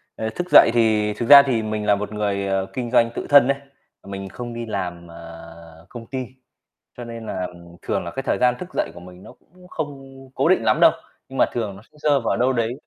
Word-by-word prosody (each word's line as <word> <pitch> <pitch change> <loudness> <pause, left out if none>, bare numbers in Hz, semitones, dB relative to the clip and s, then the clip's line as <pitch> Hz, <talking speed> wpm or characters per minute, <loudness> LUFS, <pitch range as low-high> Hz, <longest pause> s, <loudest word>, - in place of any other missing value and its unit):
ờ, 110 - -3
thức 180 0 -4
dậy - - +7
thì 110 -2 +2
thực 120 - -5
ra 140 -1 +11
thì 125 -5 0
mình 105 -1 -3
là 105 -1 +4
một 105 +1 -5
người, 100 -2 -2
ờ, 95 -1 0
kinh 125 -2 -4
doanh 115 -2 +4
tự - - -5
thân 145 -3 +7
ấy, 140 0 +1 0.5
mình 95 0 -7
không 120 +4 -7
đi 115 0 -5
làm, 90 -5 -5
à, - - -13 0.7
công 120 -2 -10
ty, 130 -2 -4 0.7
cho 120 - -7
nên 115 -1 -8
là 95 -3 -4 0.3
thường - - -2
là 85 - -6
cái 135 - -5
thời - - 0
gian 125 -1 +3
thức 180 - -8
dậy - - -2
của 85 - -11
mình 90 +1 -14
nó - - -12
cũng 180 +1 -22
không 145 -5 -6 0.4
cố - - +1
định 185 - +3
lắm 110 -1 +2
đâu. - - +8 0.4
Nhưng 135 - -8
mà - - +5
thường 110 -5 -3
nó 95 - -13
sẽ - - -23
rơi 140 - +4
vào 115 - -1
đâu 130 +2 +2
đấy 115 -1 -1
115 Hz, 245 wpm, -22 LUFS, 100-130 Hz, 0.7 s, ra